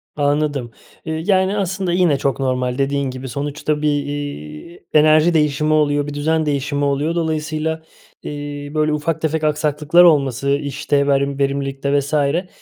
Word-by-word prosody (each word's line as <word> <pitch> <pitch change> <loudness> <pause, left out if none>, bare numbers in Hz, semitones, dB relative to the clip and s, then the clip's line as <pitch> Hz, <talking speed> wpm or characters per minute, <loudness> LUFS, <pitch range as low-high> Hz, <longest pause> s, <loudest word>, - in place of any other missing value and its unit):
Anladım. 145 -4 0 0.3
Eee, 160 0 -3
yani, 190 0 +2
aslında 190 -2 -1
yine 175 -6 +3
çok 135 0 -1
normal, 125 -1 -1
dediğin 140 0 0
gibi, 130 +1 -7
sonuçta 145 +3 -3
bir, 150 - +1 0.2
iii, 145 - -7
enerji 155 +2 +5
değişimi 150 -1 +1
oluyor, 145 -1 +2
bir 145 - -5
düzen 160 +2 0
değişimi 145 0 -1
oluyor. 145 +4 0
Dolayısıyla, 160 -1 -2 0.4
iii, 145 0 -6
böyle 155 0 +1
ufak 155 +1 -2
tefek 160 0 -1
aksaklıklar 150 +2 +3
olması, 140 -5 +3
işte, 145 0 0
verim 140 0 +1
verimlilikte 140 0 0
vs. 140 +2 -6
eee, 150 +5 +1
145 Hz, 145 wpm, -19 LUFS, 140-155 Hz, 0.4 s, enerji